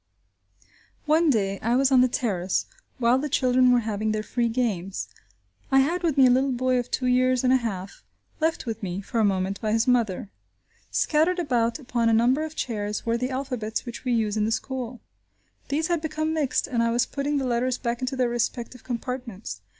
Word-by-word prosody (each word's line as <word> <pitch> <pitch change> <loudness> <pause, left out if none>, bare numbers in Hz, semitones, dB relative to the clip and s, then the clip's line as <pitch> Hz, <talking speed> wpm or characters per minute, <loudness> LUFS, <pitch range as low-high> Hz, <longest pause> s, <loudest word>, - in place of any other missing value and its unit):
One 315 +2 +3
day 195 -6 +1
I 235 +3 +1
was 270 +1 +3
on 260 -2 +6
the 255 - +5
terrace 195 -7 -1 0.3
while 245 0 +3
the 295 +2 -3
children 255 -1 +3
were 245 -1 +4
having 215 -1 -1
their 215 0 -2
free 235 +1 -1
games; 205 -6 -2 0.6
I 270 0 +6
had 340 +6 0
with 325 -5 0
me 270 - +7
a - - +6
little 265 +2 +2
boy 255 0 +1
of 245 - -4
two 255 - -1
years 255 0 +3
and 255 0 +4
a - - +6
half 200 -6 -5 0.4
left 320 -2 0
with 225 -1 -4
me, 190 -1 -3
for 230 +3 -3
a - - +4
moment, 195 -1 0
by 215 -1 0
his 225 +2 +2
mother. 220 -5 +1 0.6
Scattered 325 +4 +2
about 245 -8 0
upon 240 -5 0
a - - +3
number 245 +7 +3
of 315 0 -6
chairs, 210 -5 -3
were 230 0 +1
the 250 +2 -1
alphabets 255 -5 -3
which 235 -1 -7
we 255 - -1
use 220 -3 +1
in 210 -1 +1
the 220 - -1
school. 245 +1 -4 0.7
These 300 +3 0
had 340 -1 0
become 315 0 -2
mixed, 300 -5 0
and 240 -4 -1
I 230 - +2
was 240 +1 +2
putting 285 +1 -2
the 270 - -1
letters 250 +1 0
back 235 0 -3
into 255 +1 -2
their 250 -2 +1
respective 240 +1 -3
compartments. 235 - -5
245 Hz, 205 wpm, -25 LUFS, 225-265 Hz, 0.7 s, me